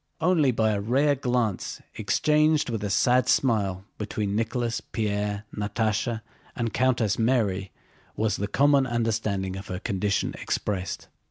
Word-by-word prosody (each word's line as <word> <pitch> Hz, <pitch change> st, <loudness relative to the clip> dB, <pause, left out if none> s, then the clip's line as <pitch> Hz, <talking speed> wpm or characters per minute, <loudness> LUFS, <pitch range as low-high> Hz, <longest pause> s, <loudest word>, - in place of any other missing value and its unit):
Only 160 Hz, -4 st, +3 dB
by 110 Hz, -3 st, +2 dB
a 100 Hz, -1 st, -1 dB
rare 135 Hz, +7 st, +3 dB
glance 125 Hz, -6 st, -1 dB
exchanged 150 Hz, -2 st, +2 dB
with 110 Hz, -2 st, -3 dB
a 105 Hz, -, -1 dB
sad 125 Hz, +6 st, +3 dB
smile 100 Hz, -7 st, +1 dB
between 105 Hz, -1 st, -2 dB
Nicholas, 115 Hz, +1 st, -1 dB
Pierre, 105 Hz, -1 st, -1 dB
Natásha, 110 Hz, +2 st, -1 dB, 0.3 s
and 115 Hz, -2 st, -2 dB
Countess 120 Hz, -5 st, +1 dB
Mary 105 Hz, -6 st, +1 dB, 0.4 s
was 110 Hz, -1 st, 0 dB
the 100 Hz, -, -2 dB
common 140 Hz, +4 st, +3 dB
understanding 110 Hz, -5 st, -1 dB
of 95 Hz, +2 st, -7 dB
her 90 Hz, -, -4 dB
condition 100 Hz, +1 st, -1 dB
expressed. 95 Hz, -3 st, -3 dB
110 Hz, 135 wpm, -26 LUFS, 100-125 Hz, 0.4 s, Only